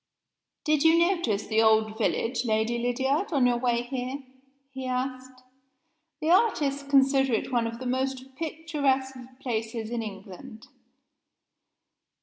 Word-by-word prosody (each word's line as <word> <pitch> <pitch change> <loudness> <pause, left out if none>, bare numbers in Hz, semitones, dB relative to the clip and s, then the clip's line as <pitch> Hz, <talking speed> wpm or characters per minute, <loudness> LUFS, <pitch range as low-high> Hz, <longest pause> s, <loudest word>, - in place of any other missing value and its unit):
"Did 305 -2 +2
you 325 +1 +5
notice 335 - +1
the 220 0 +2
old 220 -1 +3
village, 230 +2 0
Lady 220 +1 0
Lydiard, 265 - 0
on 275 -5 +3
your 245 -1 +3
way 240 -1 +1
here?" 260 +2 -5 0.5
he 265 -1 -6
asked. 255 0 -4 0.8
"The 315 +2 +1
artists 300 -9 +2
consider 270 -2 +3
it 220 - -1
one 235 -2 +1
of 230 0 -6
the 255 - -8
most 260 +1 -2
picturesque 285 -4 -1 0.2
places 225 -2 -3
in 240 -1 -2
England." 200 +2 -9
255 Hz, 130 wpm, -27 LUFS, 230-275 Hz, 0.8 s, you